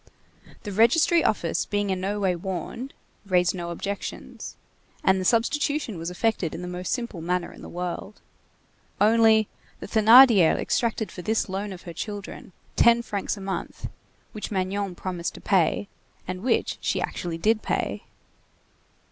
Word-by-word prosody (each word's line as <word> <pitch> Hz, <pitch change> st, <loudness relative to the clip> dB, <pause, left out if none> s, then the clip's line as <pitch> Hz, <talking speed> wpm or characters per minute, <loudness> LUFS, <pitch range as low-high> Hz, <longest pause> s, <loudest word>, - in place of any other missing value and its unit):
The 205 Hz, -, -5 dB
registry 290 Hz, -, +4 dB
office 170 Hz, -5 st, 0 dB
being 205 Hz, -1 st, -1 dB
in 185 Hz, -1 st, -2 dB
no 200 Hz, +2 st, -2 dB
way 190 Hz, -3 st, +1 dB
warned, 190 Hz, +8 st, -5 dB, 0.3 s
raised 180 Hz, -3 st, +2 dB
no 175 Hz, -2 st, -5 dB
objections, 200 Hz, +4 st, -6 dB, 0.5 s
and 190 Hz, 0 st, +3 dB
the -, -, -3 dB
substitution 245 Hz, -, +1 dB
was 165 Hz, +1 st, -4 dB
effected 180 Hz, -2 st, -1 dB
in 175 Hz, -, -6 dB
the -, -, -5 dB
most 180 Hz, 0 st, -4 dB
simple 235 Hz, -9 st, -3 dB
manner 180 Hz, +1 st, -2 dB
in -, -, -14 dB
the -, -, -9 dB
world. 180 Hz, +3 st, -5 dB, 0.8 s
Only, 220 Hz, 0 st, +5 dB, 0.3 s
the -, -, -7 dB
Thénardier 220 Hz, -4 st, +7 dB
exacted 225 Hz, -2 st, -1 dB
for 180 Hz, -, -8 dB
this 220 Hz, +4 st, 0 dB
loan 195 Hz, +2 st, -3 dB
of 185 Hz, -1 st, -9 dB
her 170 Hz, -, -8 dB
children, 205 Hz, 0 st, -7 dB, 0.2 s
ten 235 Hz, 0 st, +5 dB
francs 205 Hz, -1 st, -3 dB
a -, -, -9 dB
month, 190 Hz, 0 st, -5 dB, 0.4 s
which 215 Hz, -, -6 dB
Magnon 195 Hz, -1 st, -2 dB
promised 175 Hz, -2 st, -4 dB
to -, -, -9 dB
pay, 190 Hz, +1 st, +2 dB, 0.4 s
and 185 Hz, 0 st, -4 dB
which 240 Hz, +1 st, 0 dB
she -, -, 0 dB
actually 170 Hz, -2 st, -3 dB
did 215 Hz, +5 st, +2 dB
pay. -, -, -2 dB
200 Hz, 155 wpm, -25 LUFS, 180-220 Hz, 0.8 s, Thénardier